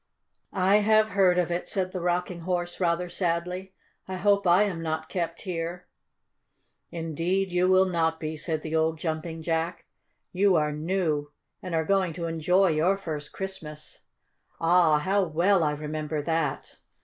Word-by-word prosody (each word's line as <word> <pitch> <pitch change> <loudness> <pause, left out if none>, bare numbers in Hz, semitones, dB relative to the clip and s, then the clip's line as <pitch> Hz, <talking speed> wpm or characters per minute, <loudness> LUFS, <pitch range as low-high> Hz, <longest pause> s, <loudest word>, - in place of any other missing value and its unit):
"I 190 +2 +3
have 215 +1 +4
heard 185 -2 +3
of 175 -1 +1
it," 175 +1 -3
said 185 -1 -1
the 185 -2 -4
Rocking 180 0 -1
Horse 175 0 -2
rather 175 0 +1
sadly. 180 +2 -2 0.3
"I 190 - -4
hope 200 +1 +2
I 175 +4 +6
am 185 -5 -2
not 160 -1 -3
kept 170 -2 -3
here." 175 -1 -4 1.0
"Indeed 170 +3 -2
you 180 +1 +3
will 185 0 +5
not 165 -3 0
be," 155 0 -4
said 155 0 -3
the 160 0 -3
old 160 0 +1
Jumping 160 0 -4
Jack. 165 +1 -2 0.5
"You 190 0 +3
are 150 -2 +2
new, 155 -2 -1 0.3
and 180 -3 -4
are 160 -1 +1
going 190 -2 +1
to 170 +1 -4
enjoy 175 +4 +2
your 165 +5 +2
first 155 -6 -6
Christmas! 160 -6 -7 0.6
Ah, 165 -2 +4
how 195 +6 +1
well 175 +2 +2
I 150 - +2
remember 150 0 -4
that! 160 -3 -2
175 Hz, 160 wpm, -27 LUFS, 160-185 Hz, 1.0 s, I